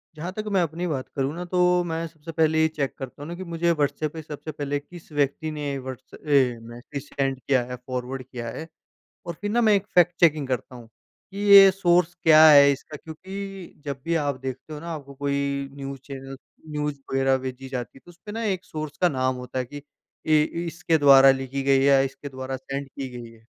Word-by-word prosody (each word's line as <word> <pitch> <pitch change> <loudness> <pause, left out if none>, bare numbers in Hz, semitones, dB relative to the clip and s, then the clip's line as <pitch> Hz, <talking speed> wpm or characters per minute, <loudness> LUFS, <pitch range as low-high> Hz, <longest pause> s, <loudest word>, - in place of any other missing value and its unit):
जहाँ 165 +4 -5
तक 215 - -3
मैं 195 -2 +3
अपनी 170 +2 -2
बात 135 -5 -3
करूँ 135 +1 -1
ना 175 +1 -5
तो 180 0 +2
मैं 165 -1 -3
सबसे 160 0 -11
पहले 160 0 +2
ये 160 - +5
चेक 150 -4 -3
करता 135 +1 -8
हूँ - - -7
ना 170 - -5
कि 185 - -7
मुझे 170 -1 0
व्हाट्सऐप 150 0 -1
पे 160 - -6
सबसे 155 +1 -7
पहले 145 -1 -3
किस 165 +2 -14
व्यक्ति 145 +2 -1
ने 145 -2 -3
व्हाट्सऐप 130 -1 -9
अ, 130 -6 +2
मैसेज 130 +3 -8
सेंड 135 -1 -1
किया 130 -1 +1
है, 125 +1 -6
फॉरवर्ड 130 +1 -4
किया 120 -2 -7
है। 160 +7 -7 0.6
और 170 - -4
फिर 205 - -2
ना 235 +3 +2
मैं 220 -3 +5
एक 200 0 0
फैक्ट 175 -1 +5
चेकिंग 155 -5 +3
करता 130 0 -3
हूँ 115 -2 -13 0.4
कि 195 - -7
ये 200 -1 +9
सोर्स 180 -2 +2
क्या 155 -1 +8
है 140 -1 +8
इसका 140 +2 -7
क्योंकि 190 +4 -8
जब 140 -2 -5
भी 170 - 0
आप 145 -4 0
देखते 130 +3 -6
हो 150 - -6
ना 170 +1 -7
आपको 140 -3 -8
कोई 140 0 -2
न्यूज़ 135 0 -6
चैनल 135 -1 -8 0.3
न्यूज़ 150 -1 -2 0.2
वगैरह 135 0 +3
भेजी 130 0 -6
जाती 125 -1 -6
है - - -26
तो - - -14
उसमें 180 +5 -11
ना 230 - -3
एक 190 -3 -1
सोर्स 155 -3 -6
का 180 - +5
नाम 130 -3 0
होता 125 +1 -6
है 130 - -1
कि 145 +4 -10 0.4
ये 155 -1 +5 0.2
ये 170 - -2
इसके 170 -1 0
द्वारा 135 -2 +8
लिखी 135 0 -2
गई 135 0 +4
है - - +2
या 140 -1 +6
इसके 135 +1 -3
द्वारा 130 0 -5
सेंड 135 +1 -6
की 135 0 -6
गई 120 -1 -9
है। 115 -1 -19
145 Hz, 225 wpm, -25 LUFS, 135-170 Hz, 0.6 s, ये